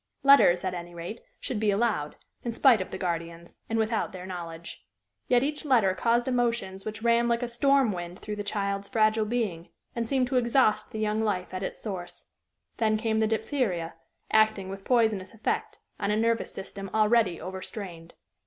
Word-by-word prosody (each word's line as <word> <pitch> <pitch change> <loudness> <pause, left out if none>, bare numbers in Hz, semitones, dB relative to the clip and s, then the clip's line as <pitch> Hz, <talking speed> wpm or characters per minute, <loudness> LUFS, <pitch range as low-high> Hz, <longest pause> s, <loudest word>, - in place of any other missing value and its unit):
Letters, 275 -11 +6
at 185 -1 -1
any 175 0 -7
rate, 175 +7 -6 0.2
should 240 - -3
be 215 -1 +2
allowed, 200 -8 0 0.3
in 235 - -2
spite 235 -2 +5
of 185 - -5
the 190 - -5
guardians, 170 -1 -4
and 225 - 0
without 220 -1 0
their 185 -2 -8
knowledge. 170 -2 -7 0.4
Yet 245 0 +4
each 295 +1 -2
letter 235 -10 +3
caused 235 +5 +1
emotions 235 -6 -1
which 215 0 -5
ran 235 0 +3
like 235 +1 +1
a - - -1
storm 270 0 +3
wind 175 -1 -6
through 210 0 -6
the 205 - -3
child's 200 -1 -2
fragile 215 0 +3
being, 210 -7 -2 0.3
and 230 -1 -2
seemed 260 -2 +2
to 260 - +1
exhaust 235 -3 +2
the - - -6
young 215 0 0
life 185 -4 -2
at 185 - -3
its - - -4
source. 185 -5 -6 0.5
Then 215 -1 +2
came 220 0 0
the 220 - +3
diphtheria, 215 - -1 0.4
acting 215 -3 +3
with 195 0 -8
poisonous 220 -5 +1
effect 220 - -2 0.2
on - - -1
a 210 - +2
nervous 230 +1 +1
system 195 0 -7
already 215 -4 +3
overstrained. 185 -2 -7
215 Hz, 180 wpm, -27 LUFS, 185-235 Hz, 0.5 s, Letters